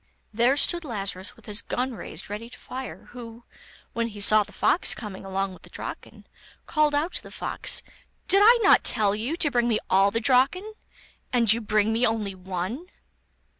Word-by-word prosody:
There 240 +5 +3
stood 345 +4 +3
Lazarus 200 -7 -4
with - - -19
his 210 +1 -1
gun 255 +1 -2
raised 200 - -7
ready 210 +3 -7
to - - -12
fire, 260 +1 -8
who, 235 -1 -10 0.5
when 230 0 -1
he 210 -2 -9
saw 215 +1 +6
the 205 - -6
fox 350 - +2
coming 205 -5 -8
along 195 0 -2
with - - -15
the - - -15
Draken, - - -8 0.4
called 305 -2 +1
out 310 +5 0
to - - -2
the - - -12
fox: - - -2 0.4
'Did 390 - +4
I 470 +3 +7
not 395 - +6
tell 210 -4 +2
you 230 +9 -2
to 295 -4 +1
bring 240 -1 +1
me 225 -3 +2
all 195 +1 +5
the 230 - -1
Draken, 275 - +2 0.6
and 230 -4 +4
you 230 - -3
bring 215 0 +1
me 230 +2 0
only 215 -3 -2
one? 190 - -5
230 Hz, 190 wpm, -25 LUFS, 205-265 Hz, 0.6 s, I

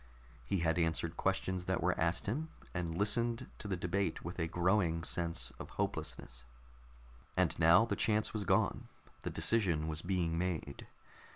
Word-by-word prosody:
He 85 +9 -1
had 80 +1 +2
answered 80 0 0
questions 95 -1 -1
that 95 -1 0
were 90 +1 +3
asked 85 +2 0
him, 150 +10 -2 0.2
and 85 -3 -2
listened 115 +3 +1
to - - -5
the 95 -2 -1
debate 90 -1 -1
with 85 +2 -5
a 80 - 0
growing 85 -1 +1
sense 85 0 -1
of - - -7
hopelessness. - - -3 0.9
And - - +3
now 85 +6 +7
the - - -1
chance 110 -1 +1
was 105 -2 -1
gone. - - +1 0.3
The - - -3
decision 85 -9 +2
was 80 0 -3
being 85 -3 0
made. 85 -6 -3
90 Hz, 160 wpm, -34 LUFS, 80-100 Hz, 0.9 s, now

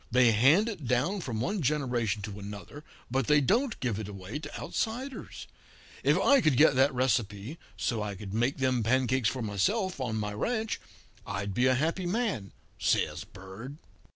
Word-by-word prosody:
They 125 -1 +5
hand 140 - +5
it 185 - -5
down 145 - +1
from 120 -8 -3
one 200 - -1
generation 120 -8 0
to 105 -1 -6
another, 105 +8 -8 0.3
but 130 -1 0
they 150 0 +5
don't 230 - +1
give 115 -5 -1
it 110 - -5
away 100 +5 -6
to 145 -1 -7
outsiders. 255 +5 -4 0.6
If - - +3
I 280 -2 +5
could 150 - +3
get 150 0 +6
that 135 +2 +4
recipe, 120 +1 -1 0.2
so 115 -3 -1
I 105 -1 -3
could 95 0 -8
make 120 +5 +1
them 130 -3 +1
pancakes 130 0 +2
for 130 -3 -4
myself 180 - 0
on 115 -4 -2
my 105 -1 -2
ranch, 220 - -2 0.4
I'd 100 0 -4
be 125 +5 +3
a 130 - +4
happy 165 +6 0
man,' 190 - -1 0.3
says - - +1
Bird. 100 +10 -10
130 Hz, 175 wpm, -29 LUFS, 105-160 Hz, 0.6 s, get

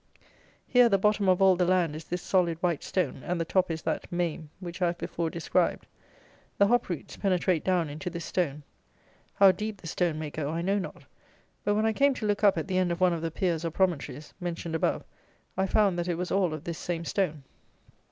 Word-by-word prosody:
Here 245 -1 +5
the 200 - +4
bottom 205 0 +2
of 185 +1 +4
all 190 -1 +6
the 180 - +1
land 175 -4 +2
is 155 - -8
this 175 0 -4
solid 175 -4 +2
white 170 -4 +1
stone, 170 -8 -1
and 180 0 -2
the 165 - 0
top 185 +2 +1
is 160 -1 -4
that - - -3
mame, 170 -3 -2
which 175 0 -7
I 180 - +4
have 170 0 -2
before 170 -1 -3
described. 170 0 0 0.7
The 200 - +5
hop 240 +2 +2
roots 170 -5 -5
penetrate 185 -4 +1
down 180 -3 +1
into 150 +5 -5
this 170 -1 -6
stone. 150 -5 -1 0.7
How 195 -1 +7
deep 210 +2 -5
the - - -14
stone 165 -1 0
may 155 -1 -5
go 145 -2 -3
I 165 +2 -2
know 195 +3 +1
not; 190 - -7 0.6
but, 205 - +1
when 215 +1 +2
I 220 - +2
came 280 +2 +3
to 220 - -4
look 205 0 0
up 200 -3 +5
at 160 - -2
the 185 -1 +1
end 180 -1 +1
of 170 - -2
one 185 -1 +4
of 165 - -3
the 165 - -1
piers, 165 -1 -1
or 165 - 0
promontories, 155 -5 -1
mentioned 170 -2 -4
above, 160 - 0 0.5
I 190 +1 +1
found 195 -3 +2
that 175 - -2
it 175 - 0
was 180 +2 -4
all 190 -3 +2
of 155 - -9
this 170 -1 -5
same 170 -1 -3
stone. 160 -8 -1
175 Hz, 230 wpm, -28 LUFS, 165-190 Hz, 0.7 s, How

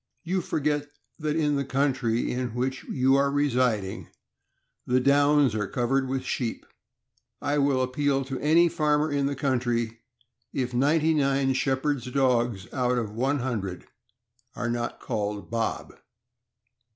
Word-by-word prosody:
You 185 +2 -1
forget 150 -2 -1 0.3
that 155 -1 -1
in 150 -3 +1
the 140 - 0
county 130 -4 0
in 125 -2 -3
which 130 +2 -2
you 130 +1 +2
are 140 0 +3
residing 125 -8 0 0.8
the 125 +1 +3
downs 145 -1 +4
are 105 -2 -1
covered 130 +3 0
with 135 0 -2
sheep. 120 -3 -3 0.7
I 145 0 0
will 140 -2 +2
appeal 135 +1 0
to 135 -1 -4
any 165 +4 +4
farmer 150 -1 +1
in 140 -1 +1
the 140 - -2
country, 120 -4 -1 0.5
if 125 -2 -2
ninety 150 +5 +3
nine 135 -2 +2
shepherd' 135 +2 0
s 120 - -10
dogs 120 -6 +1
out 125 -2 +1
of 110 -4 -2
one 130 +5 0
hundred 105 -8 -3 0.7
are 120 -1 -2
not 120 0 -3
called 105 0 -3
Bob. 115 -1 -2
135 Hz, 140 wpm, -26 LUFS, 120-145 Hz, 0.8 s, downs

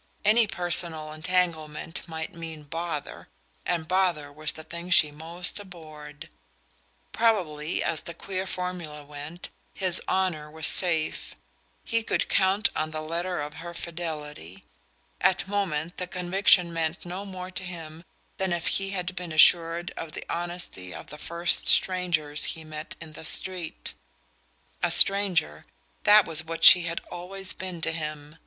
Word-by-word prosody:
Any 220 +2 +5
personal 170 -4 +2
entanglement 165 -1 -1
might 160 -1 -6
mean 160 -2 -8
"bother," 165 0 -6 0.4
and 170 -3 -1
bother 175 -6 0
was 155 +1 0
the 160 - -9
thing 170 +2 -8
she 155 -4 +6
most 165 +6 -5
abhorred. 155 -5 -11 0.8
Probably, 175 -9 0
as 160 -3 -2
the 170 - -9
queer 190 0 -5
formula 180 -5 -5
went, 150 +4 -8 0.2
his 185 -2 +5
"honour" 180 -6 -1
was 160 +1 -5
safe: 165 -4 +3 0.5
he 230 -1 0
could 220 - -2
count 195 +3 +3
on 155 0 -2
the 155 0 -5
letter 170 +1 -3
of 150 0 -6
her 170 0 -8
fidelity. 150 - -7 0.6
At 190 +1 +2
moment 175 -5 -2
the 180 - -4
conviction 180 -1 +3
meant 165 +1 -3
no 180 +3 -6
more 185 -2 -8
to 185 - -4
him 165 -3 -9 0.3
than 190 -1 -1
if 170 -1 -2 0.2
he 195 - -3
had 185 -1 -4
been 175 -2 -6
assured 165 +2 +4
of 160 -1 -7
the - - -7
honesty 175 - -3
of - - -11
the 150 - -10
first 170 +2 +4
strangers 165 -5 +2
he 160 - -9
met 155 0 -7
in 160 -1 -11
the 155 - -11
street. 170 +2 -2 0.9
A - - +1
stranger 185 - +3 0.4
that 210 -1 +7
was 160 -1 +1
what 165 0 -6
she 175 -2 +10
had 170 0 -3
always 185 +2 -2
been 185 -3 -7
to 165 - 0
him. 150 -1 -6
170 Hz, 150 wpm, -26 LUFS, 155-180 Hz, 0.9 s, she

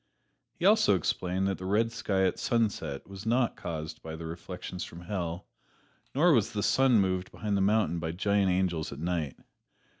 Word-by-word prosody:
He 175 - -2
also 210 - +5
explained 90 +2 0
that 95 - -2
the 95 - -6
red 110 +4 +2
sky 100 -5 0
at - - 0
sunset 100 - -1
was 100 +2 -8
not 120 +1 +2
caused 80 -2 -6
by 80 0 -6
the 80 0 -7
reflections 90 +2 -6
from 85 - -9
Hell, 90 -1 -4 0.7
nor 165 +4 +5
was 115 -3 +2
the 105 -1 -1
sun 130 -4 +4
moved 95 -1 0
behind 105 -2 -2
a 100 - +2
mountain 100 -4 +2
by 80 -1 -2
giant 100 +2 +1
angels 90 -4 0
at 70 - -7
night. 80 -3 -2
95 Hz, 180 wpm, -29 LUFS, 85-110 Hz, 0.7 s, also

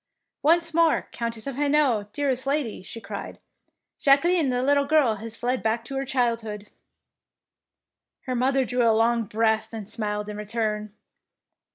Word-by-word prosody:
" - - -60
Once 335 -1 +2
more 335 0 +3
Countess 230 -2 -4
of 275 -2 -4
Hainault, 280 -8 +2
dearest 270 0 -1
lady,^^ 275 -9 -1
she 230 - -8
cried, 200 -1 -7 0.6
"Jacqueline 300 +2 +4
the 250 0 0
little 280 +1 +3
girl 280 -7 +3
has 225 +2 -7
fled 250 +1 -1
back 225 +1 -1
to 270 - -6
her 270 0 -2
child 245 -3 +1
hood.^' 210 -2 -8 1.5
Her 255 - -4
mother 260 +2 +2
drew 245 0 0
a 230 -2 +4
long 230 0 +2
breath 220 +1 0
and 215 -3 -6
smiled 210 -1 -3
in 210 0 -6
return. 210 0 -2
235 Hz, 160 wpm, -25 LUFS, 220-275 Hz, 1.5 s, Jacqueline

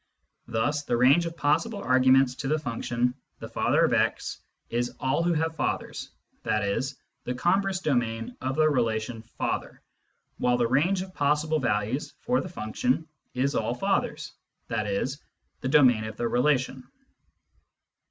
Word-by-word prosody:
Thus 145 +6 0
the 120 -5 -1
range 140 +8 +5
of 165 0 -7
possible 180 +10 +1
arguments 130 -4 +4
to 135 - -4
the 155 +3 +2
function 125 -3 -1
" - - -47
the - - -6
father - - +2
of - - +1
x - - 0 0.2
" - - -54
is 120 +1 -1
all 135 +5 +1
who 170 0 +2
have 160 0 -1
fathers, - - -3 0.3
i.e. 100 -2 0 0.4
the 125 - -3
con 175 +9 +3
verse 195 -2 -2
domain 115 -7 -1
of 130 +1 -2
the 155 0 +4
relation 115 -4 0 0.2
father, - - -2 0.6
while 125 0 +2
the 120 - +2
range 165 +10 +2
of 190 -1 -12
possible 150 +1 +1
values 115 +2 -1
for 250 +2 +1
the 185 - -7
function 165 - -1 0.3
is 135 +2 +1
all - - 0
fathers, - - -1 0.4
i.e. 105 -3 0 0.5
the 130 - -3
domain 130 -6 +5
of 110 0 -7
the 120 - 0
relation. 130 +1 +1
130 Hz, 155 wpm, -27 LUFS, 120-155 Hz, 0.6 s, range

